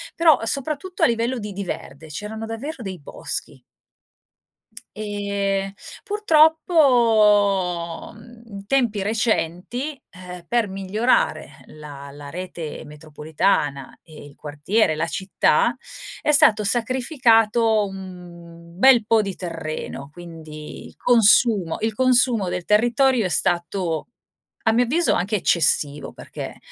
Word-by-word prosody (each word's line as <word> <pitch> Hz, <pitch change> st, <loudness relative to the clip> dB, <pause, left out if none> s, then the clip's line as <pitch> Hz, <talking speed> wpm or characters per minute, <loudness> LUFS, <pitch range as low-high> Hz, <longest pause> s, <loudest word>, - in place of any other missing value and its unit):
però 325 Hz, -3 st, +4 dB
soprattutto 305 Hz, +8 st, -1 dB
a -, -, +8 dB
livello 235 Hz, +2 st, -1 dB
di 210 Hz, -1 st, -6 dB
di 200 Hz, +1 st, -5 dB
verde, 160 Hz, -3 st, -7 dB
c'erano 210 Hz, +7 st, -6 dB
davvero 235 Hz, +5 st, -6 dB
dei 185 Hz, -3 st, -6 dB
boschi. 145 Hz, -, -6 dB, 1.4 s
Ehm, 200 Hz, -2 st, -2 dB, 0.3 s
purtroppo, 230 Hz, -, +3 dB
mhmm, 230 Hz, +1 st, -15 dB
in 200 Hz, 0 st, -9 dB
tempi 235 Hz, -7 st, +1 dB
recenti, 220 Hz, -, -1 dB, 0.2 s
eh, 180 Hz, -1 st, -10 dB
per 235 Hz, -2 st, +1 dB
migliorare 205 Hz, -, -1 dB
la 145 Hz, -2 st, -11 dB
la 145 Hz, 0 st, -11 dB
rete 175 Hz, -3 st, -7 dB
metropolitana 150 Hz, -1 st, -2 dB
e 155 Hz, -3 st, -14 dB
il 145 Hz, -, -14 dB
quartiere, 155 Hz, +5 st, -1 dB
la 160 Hz, +2 st, -1 dB
città, 190 Hz, +3 st, +1 dB, 0.5 s
è 300 Hz, -, +3 dB
stato 220 Hz, -7 st, +5 dB
sacrificato 230 Hz, -2 st, +2 dB
un 175 Hz, -3 st, -11 dB
bel 245 Hz, -2 st, +6 dB
po' 225 Hz, 0 st, +3 dB
di 195 Hz, -2 st, -5 dB
terreno, 155 Hz, -5 st, -6 dB
quindi 160 Hz, -3 st, -10 dB
il -, -, -18 dB
consumo 220 Hz, -6 st, +3 dB
il 220 Hz, 0 st, -1 dB
consumo 240 Hz, -5 st, +2 dB
del 180 Hz, -1 st, -4 dB
territorio 240 Hz, +3 st, +2 dB
è -, -, -1 dB
stato, 175 Hz, -2 st, -1 dB, 0.6 s
a 225 Hz, -, +3 dB
mio 245 Hz, +2 st, +2 dB
avviso, 335 Hz, +8 st, +1 dB
anche 200 Hz, +4 st, -1 dB
eccessivo, 150 Hz, -5 st, +1 dB
perché -, -, -9 dB
200 Hz, 115 wpm, -22 LUFS, 170-235 Hz, 1.4 s, a